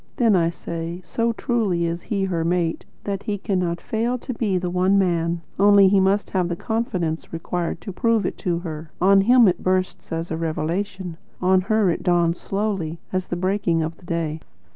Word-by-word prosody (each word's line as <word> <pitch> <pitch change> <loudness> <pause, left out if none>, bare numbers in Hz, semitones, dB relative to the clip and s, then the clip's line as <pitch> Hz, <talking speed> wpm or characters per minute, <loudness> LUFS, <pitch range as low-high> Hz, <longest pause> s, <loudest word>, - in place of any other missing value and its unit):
then 230 -4 +4
I 165 -2 +3
say, 170 0 -5
so 230 +4 0
truly 215 -8 0
is 170 +1 -2
he 200 0 -2
her 175 -4 -1
mate, 170 -1 0 0.2
that 200 -1 -3
he 205 -1 -2
cannot 180 -4 -1
fail 230 +6 -1
to 255 +1 -6
be 210 -5 0
the 180 -1 -2
One 185 +2 +3
Man; 170 -3 +1 0.2
only 200 -1 +7
he 195 0 +4
must 195 +2 +1
have 180 -2 0
the 170 - -1
confidence 180 -7 -2
required 170 +1 -3
to 195 - -7
prove 230 -1 +1
it - - -2
to 175 -2 0
her. 160 -2 -6
On 195 +2 +5
him 240 +2 +6
it 180 - +1
bursts, 185 0 -1
as 165 +1 -3
a 160 - -1
revelation; 170 +3 -3 0.2
on 185 0 +3
her 215 -1 +2
it - - -3
dawns 175 -2 +2
slowly, 195 -6 -2
as 185 -1 -1
the - - -2
breaking 180 -2 +1
of 160 +1 -4
the 180 - -18
day." 165 -3 -2
185 Hz, 195 wpm, -23 LUFS, 170-200 Hz, 0.2 s, only